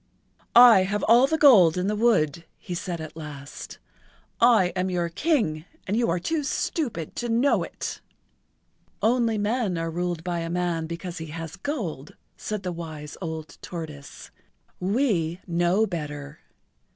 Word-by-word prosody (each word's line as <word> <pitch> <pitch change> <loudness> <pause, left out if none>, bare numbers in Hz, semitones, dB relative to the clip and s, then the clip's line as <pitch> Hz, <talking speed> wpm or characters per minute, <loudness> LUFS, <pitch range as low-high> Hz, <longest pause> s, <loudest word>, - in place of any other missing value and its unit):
"I 240 -5 +9
have 200 +2 -1
all 240 +4 +6
the 320 - 0
gold 200 - +7
in 180 - 0
the 210 +2 0
wood," 210 -10 +2 0.2
he[Pg - - -30
83] 180 - -4
said 175 -1 -4
at 155 -1 -8
last. 145 -3 -9 0.6
"I 230 -6 +5
am 185 0 0
your 175 -2 -1
King 195 - 0 0.2
and 200 - -1
you 235 +1 +1
are 165 - +1
too 310 - -1
stupid 255 - -2
to 240 - -3
know 240 +5 +3
it." - - -5 1.0
"Only 230 -1 +2
men 210 -3 0
are 165 0 -2
ruled 175 -1 -3
by 175 -1 -2
a 165 0 -4
man 170 -2 -1
because 170 +1 -6
he 160 - -6
has 165 +2 -7
gold," 185 - -5 0.2
said 210 -2 -5
the 180 - -2
wise 155 -3 -7
old 160 -2 -6
tortoise. 155 -5 -8 0.5
"We 185 - 0
know 175 +4 +2
better. 150 -5 -6
180 Hz, 155 wpm, -25 LUFS, 165-220 Hz, 1.0 s, I